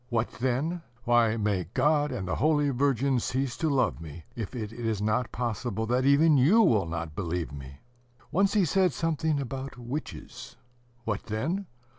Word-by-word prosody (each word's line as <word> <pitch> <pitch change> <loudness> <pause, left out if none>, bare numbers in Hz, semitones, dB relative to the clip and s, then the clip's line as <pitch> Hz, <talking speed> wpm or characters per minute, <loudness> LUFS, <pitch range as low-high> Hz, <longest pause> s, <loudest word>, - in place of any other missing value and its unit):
What 115 -1 0
then? 135 +8 0 0.2
(Why, 115 -2 +3
may 100 -4 0
God 150 +2 +3
and 95 - -4
the - - -1
Holy 145 0 +2
Virgin 135 0 +1
cease 130 +1 -2
to 160 - 0
love 130 - +1
me 80 0 -9
if 115 +1 -5
it 110 -2 -5
is 115 -3 -2
not 110 +3 0
possible 115 -2 -2
that 125 +3 +1
even 145 +2 +5
you 165 - +5
will 110 - +3
not 85 -1 -4
believe 85 0 -3
me!) 70 -1 -10 0.5
Once 195 +5 +2
he 200 -4 +4
said 185 +3 +2
something 160 -2 0
about 135 0 -5
witches;... 125 +5 -7 0.5
What 105 -3 -3
then? 160 - -2
125 Hz, 165 wpm, -28 LUFS, 110-145 Hz, 0.5 s, even